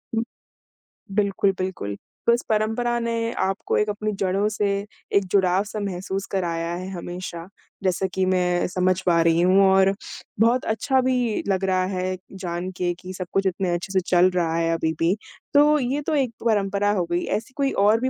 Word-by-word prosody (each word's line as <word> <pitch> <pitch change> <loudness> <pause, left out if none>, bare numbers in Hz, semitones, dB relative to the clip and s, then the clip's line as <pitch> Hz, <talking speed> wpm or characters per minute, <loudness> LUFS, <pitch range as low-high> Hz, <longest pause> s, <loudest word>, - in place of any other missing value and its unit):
हुँ, 225 - +1 0.9
बिल्कुल, 200 -1 +2
बिल्कुल, 185 - -3 0.3
बस 235 +1 +4
परंपरा 225 +3 +1
ने 230 0 -1
आपको 195 +1 0
एक 210 - +1
अपनी 215 +1 -2
जड़ों 195 +2 +1
से 210 -1 0 0.5
एक 200 - +5
जुड़ाव-सा 195 +2 +2
महसूस 195 0 -3
कराया 170 -3 -1
है 185 +2 -5
हमेशा, 175 -1 -6 0.4
जैसा 190 0 +1
कि 190 0 +1
मैं 180 -1 +1
समझ 185 0 +1
पा 170 -2 +4
रही 165 0 +3
हूँ 185 +2 +5
और 190 0 +5 0.5
बहुत 235 +3 +3
अच्छा 265 +3 +1
भी 250 -4 0
लग 195 -1 0
रहा 185 -1 +2
है 185 0 -2 0.3
जान 175 +1 -3
के 175 -1 0
कि 185 0 -8
सब 185 -1 -5
कुछ 195 0 +1
इतने 185 -1 -1
अच्छे 175 +2 -3
से 190 - +4
चल 180 0 +5
रहा 170 -3 0
है 165 0 +1
अभी 160 -1 0
भी। 170 +4 +3 0.4
तो 295 +1 +6
ये 270 +3 -1
तो 315 - +1
एक 260 -5 +1
परंपरा 205 -2 +2
हो 185 -4 0
गई, 175 +1 +1
ऐसी 225 +4 -3
कोई 275 -1 +1
और 210 +3 +3
भी 260 - +1
190 Hz, 180 wpm, -23 LUFS, 180-215 Hz, 0.9 s, तो